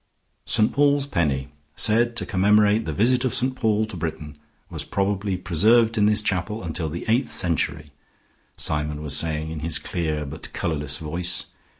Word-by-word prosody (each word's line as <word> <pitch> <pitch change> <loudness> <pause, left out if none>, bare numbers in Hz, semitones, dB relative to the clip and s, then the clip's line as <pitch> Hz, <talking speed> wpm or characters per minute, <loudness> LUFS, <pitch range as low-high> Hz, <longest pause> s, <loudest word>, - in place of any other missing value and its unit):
"St. 110 - +2
Paul's 145 0 +2
Penny, 75 - -1 0.3
said 115 +2 +3
to - - -2
commemorate 105 +3 +2
the 80 - -3
visit 120 - +2
of 130 - 0
St. 130 +1 0
Paul 110 -3 0
to 110 - -9
Britain, 80 -3 -6 0.3
was - - -3
probably 100 -1 -2
preserved 110 +7 +3
in 105 -2 +3
this 105 0 +3
chapel 100 +3 -2
until 80 -1 -3
the 85 +3 -6
eighth 120 +4 +1
century," 80 -4 -1 0.7
Symon 75 0 0
was 75 -2 +3
saying 80 -1 +1
in 80 - -6
his 80 +1 +2
clear 80 -3 -3
but 70 +3 -8
colorless 75 -3 -1
voice. 85 +3 -1
90 Hz, 165 wpm, -23 LUFS, 80-110 Hz, 0.7 s, said